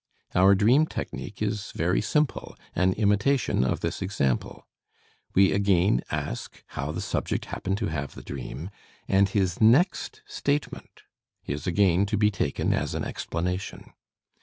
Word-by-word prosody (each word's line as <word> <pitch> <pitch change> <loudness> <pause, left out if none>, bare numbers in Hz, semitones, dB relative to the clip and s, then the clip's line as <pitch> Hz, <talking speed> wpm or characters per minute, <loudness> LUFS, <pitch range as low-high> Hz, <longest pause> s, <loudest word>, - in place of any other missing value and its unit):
Our 95 +2 +6
dream 125 +11 +4
technique 105 -7 -5
is 105 -1 -2
very 90 +4 +1
simple, 150 -3 -1 0.2
an 90 +2 +3
imitation 105 - +2
of 65 - -1
this - - -3
example. 90 -10 -1 0.7
We 95 0 +6
again 95 -8 +3
ask - - -5
how 70 +2 -4
the - - -4
subject - - -2
happened 95 +1 -3
to 110 - -2
have 70 -5 -4
the - - -10
dream, 85 +8 -6 0.4
and 95 0 +3
his 95 -2 0
next 175 - +3
statement 150 - -3 0.4
is 70 +3 -4
again 95 +1 +3
to 105 - 0
be 105 0 +3
taken 85 -8 0
as - - -1
an - - -2
explanation. 90 +3 -4
100 Hz, 140 wpm, -26 LUFS, 90-105 Hz, 0.7 s, Our